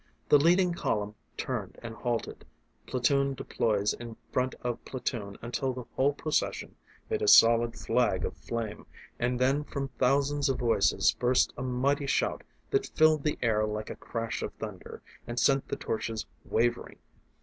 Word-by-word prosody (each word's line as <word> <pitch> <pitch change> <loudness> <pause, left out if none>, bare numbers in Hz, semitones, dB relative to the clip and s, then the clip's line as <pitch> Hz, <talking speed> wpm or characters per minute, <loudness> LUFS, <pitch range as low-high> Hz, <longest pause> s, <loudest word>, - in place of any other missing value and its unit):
The 145 - +7
leading 175 +3 +4
column 105 -10 -1 0.2
turned - - -4
and 115 -1 -6
halted, 120 0 -3 0.4
platoon 140 +2 +1
deploys 105 -5 0
in 115 -2 -8
front 130 0 0
of 120 -1 -3
platoon 115 -6 -4
until 130 +2 -2
the 125 -1 -7
whole 140 +2 +3
procession 155 +1 -2 0.3
made 440 -1 -1
a 430 - 0
solid 115 - +6
flag - - +1
of - - -4
flame, 115 -3 -5 0.3
and 125 +1 0
then 135 +3 +2
from 140 -2 -4
thousands 140 +2 +2
of 135 - +1
voices 115 -5 +3
burst 125 +1 +3
a - - -6
mighty 135 +3 0
shout - - 0 0.3
that 410 -1 +1
filled 155 -1 +4
the 150 - 0
air 110 -2 +2
like 105 0 -3
a - - -6
crash 115 -1 -4
of - - -3
thunder, 105 -4 -8 0.2
and 120 0 -2
sent 135 +2 +3
the - - -2
torches 110 0 -3 0.2
wavering. 120 +2 0
125 Hz, 160 wpm, -29 LUFS, 115-140 Hz, 0.4 s, The